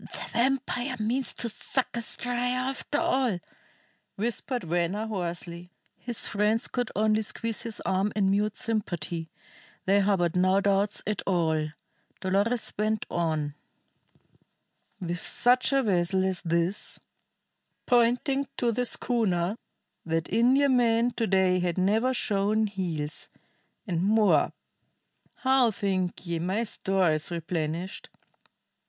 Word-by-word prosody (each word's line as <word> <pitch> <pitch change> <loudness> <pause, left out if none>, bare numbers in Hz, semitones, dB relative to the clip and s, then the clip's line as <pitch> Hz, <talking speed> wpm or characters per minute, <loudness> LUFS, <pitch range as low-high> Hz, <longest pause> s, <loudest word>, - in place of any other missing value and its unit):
"The - - -8
vampire 260 0 0
means 240 +5 0
to 235 - -2
suck 250 +4 -2
us 235 -1 -2
dry 245 0 -1
after 255 +3 -1
all!" 260 - +1 0.8
whispered 240 +4 -2
Venner 175 +5 -1
hoarsely. 175 -3 -4 0.3
His 240 -2 -3
friends 210 +2 +1
could 245 -2 -2
only 215 +1 +3
squeeze 225 +1 -2
his 230 -2 -4
arm 190 +2 0
in 195 -2 +2
mute 210 +1 +1
sympathy. 175 -7 -2 0.6
They 195 +2 +4
harbored 190 -4 +2
no 185 +2 +4
doubts 200 +1 +1
at 210 -1 -1
all. 160 -4 +1 0.5
Dolores 205 +5 0
went 215 0 0
on: 155 -4 -1 1.5
"With 175 -2 -3
such 250 +7 +3
a 275 -1 +3
vessel 190 -2 +2
as 190 -2 0
this" 170 +3 -1 0.9
pointing 250 +3 +2
to 240 -1 +2
the 245 +2 0
schooner 200 -8 0 0.5
"that 165 0 -1
Indiaman 245 -1 +4
to 225 - 0
day 185 -1 +3
had 175 -1 -1
never 215 +7 +2
shown 215 -3 +1
heels. 170 -7 -3 0.6
And 175 -5 -1
more, 210 +2 +4 0.8
how 260 -2 +3
think 190 -4 -2
ye 170 -1 -2
my 190 +7 0
store 195 -5 +1
is 155 0 -1
replenished? 170 +1 -3
205 Hz, 120 wpm, -27 LUFS, 175-235 Hz, 1.5 s, They